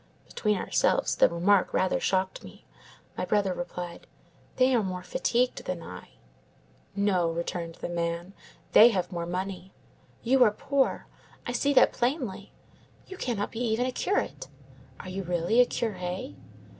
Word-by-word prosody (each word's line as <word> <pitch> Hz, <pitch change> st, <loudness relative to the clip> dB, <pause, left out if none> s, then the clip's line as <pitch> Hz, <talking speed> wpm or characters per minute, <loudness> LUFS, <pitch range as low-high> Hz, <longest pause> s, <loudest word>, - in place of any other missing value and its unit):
"Between 210 Hz, -2 st, -1 dB
ourselves, -, -, +1 dB
the -, -, +5 dB
remark 180 Hz, +3 st, +2 dB
rather 185 Hz, -, +2 dB
shocked 190 Hz, 0 st, -1 dB
me. -, -, -14 dB, 0.5 s
My -, -, -3 dB
brother 200 Hz, -3 st, +1 dB
replied:— 175 Hz, 0 st, -6 dB, 0.5 s
"'They 255 Hz, 0 st, +3 dB
are 235 Hz, -, +3 dB
more 185 Hz, -2 st, -4 dB
fatigued 245 Hz, +6 st, 0 dB
than 175 Hz, -2 st, -4 dB
I.' 90 Hz, -, -10 dB, 0.9 s
"'No,' 195 Hz, -4 st, +2 dB
returned 170 Hz, 0 st, -4 dB
the -, -, -5 dB
man, 170 Hz, +1 st, -3 dB, 0.4 s
'they 230 Hz, -, +9 dB
have 190 Hz, -4 st, -2 dB
more 170 Hz, -1 st, -4 dB
money. 185 Hz, +1 st, -4 dB, 0.5 s
You 255 Hz, +2 st, +5 dB
are 230 Hz, -, +6 dB
poor; 270 Hz, +6 st, 0 dB, 0.4 s
I -, -, -2 dB
see 280 Hz, +4 st, +1 dB
that -, -, +6 dB
plainly. 240 Hz, -, -2 dB, 0.5 s
You 380 Hz, -, -9 dB
cannot 235 Hz, -, -2 dB
be 225 Hz, -, -6 dB
even 240 Hz, 0 st, 0 dB
a 255 Hz, -, -1 dB
curate. 390 Hz, +10 st, -2 dB, 0.5 s
Are 185 Hz, -, -8 dB
you 190 Hz, +1 st, -4 dB
really 175 Hz, +6 st, +2 dB
a 245 Hz, -, +4 dB
curé? 180 Hz, -, -4 dB
190 Hz, 150 wpm, -28 LUFS, 175-240 Hz, 0.9 s, they